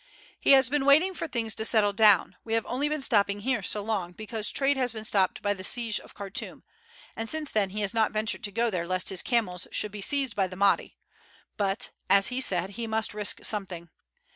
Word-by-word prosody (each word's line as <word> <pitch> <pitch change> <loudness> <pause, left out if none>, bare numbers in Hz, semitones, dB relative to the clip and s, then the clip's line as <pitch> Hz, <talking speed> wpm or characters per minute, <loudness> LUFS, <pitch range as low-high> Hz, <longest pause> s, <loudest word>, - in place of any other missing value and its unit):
He - - +5
has 265 -2 +6
been 280 +1 0
waiting 315 +7 +5
for 330 -1 -5
things 225 -5 -1
to 220 - -4
settle 215 -3 +3
down; 205 -3 +4
we 225 0 -2
have 225 - 0
only 280 +4 -1
been 305 -2 -2
stopping 205 -5 +1
here 260 +3 -1
so 210 - 0
long 200 -5 -3
because 215 +1 -4
trade 280 +1 +1
has 255 -2 -1
been 220 -1 -7
stopped 195 -1 0
by 205 0 +1
the 190 -2 -9
siege 230 +1 0
of - - -15
Khartoum, 200 -1 -5 0.5
and 225 0 -4
since 315 -2 -1
then 205 -3 +1
he 210 +2 -4
has 205 +2 -1
not 220 -1 +2
ventured 215 0 -2
to 205 - -4
go 230 +3 0
there 170 -3 -3
lest 185 0 0
his 190 -2 +2
camels 200 -8 -1
should 210 - -1
be 210 0 -8
seized 270 -1 +1
by 195 -2 +1
the 185 - -10
Mahdi; 200 +1 +1 0.6
but, 205 +4 -2 0.2
as 195 +1 +5
he 255 +1 -2
said, 190 -5 +1
he 230 +3 -5
must 220 -1 -1
risk 210 -1 -1
something. 180 -5 -4
215 Hz, 225 wpm, -27 LUFS, 200-240 Hz, 0.6 s, has